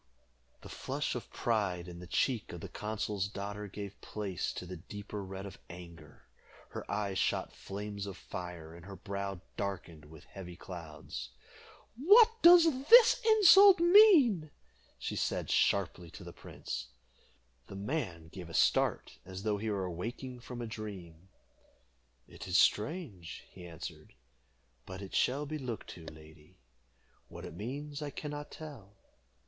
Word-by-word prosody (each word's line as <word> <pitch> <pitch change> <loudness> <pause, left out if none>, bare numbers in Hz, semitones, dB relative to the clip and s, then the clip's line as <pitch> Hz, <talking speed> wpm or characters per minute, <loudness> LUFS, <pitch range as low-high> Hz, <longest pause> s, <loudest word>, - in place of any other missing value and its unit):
The - - -11
flush - - -3
of - - -6
pride 100 -7 -1
in 85 -1 -9
the 90 - -10
cheek 120 +3 0
of 85 - -8
the - - -6
consul's 105 -2 -3
daughter 100 +1 -6
gave 100 0 -8
place 100 -5 -3
to - - -6
the 90 0 -7
deeper 105 +3 -7
red 95 +1 -7
of 100 - -10
anger. 85 -3 -12 0.5
Her - - -8
eyes 100 -2 -1
shot - - 0
flames 100 0 -6
of 100 -2 -7
fire, 90 -3 -7
and 85 0 -12
her 100 - -8
brow 100 -1 -5 0.2
darkened 90 -6 -5
with 80 +1 -14
heavy 90 -3 -10
clouds. 85 -4 -8 0.7
"What 415 - +7
does 330 -6 +7
this 480 0 +8
insult 405 -3 +8
mean?" 340 - +6 0.5
she - - -4
said - - -1
sharply 90 -3 +1
to - - -11
the - - -9
prince. 65 0 -7 0.8
The 100 - -9
young 100 +1 -6
man 100 - -3
gave 90 -1 -9
a 85 - -7
start, - - +2
as 95 +1 -8
though 105 -2 0
he 110 +1 -2
were 100 -3 -1
awaking 120 +9 -5
from 120 0 -7
a - - -3
dream. 95 -6 -8 1.0
"It - - -10
is 90 -1 +2
strange," 105 - 0
he 90 -2 -11
answered, 80 -6 -9 0.7
"but 95 0 -7
it 95 - -10
shall 140 +4 +1
be 155 +1 -4
looked 125 -5 -5
to, 85 - -11
lady. 75 -1 -14 0.7
What - - -9
it - - -8
means 140 - -6
I 150 - -3
can 150 +1 -6
not 145 0 -6
tell." 135 -11 -10
100 Hz, 155 wpm, -32 LUFS, 90-135 Hz, 1.0 s, this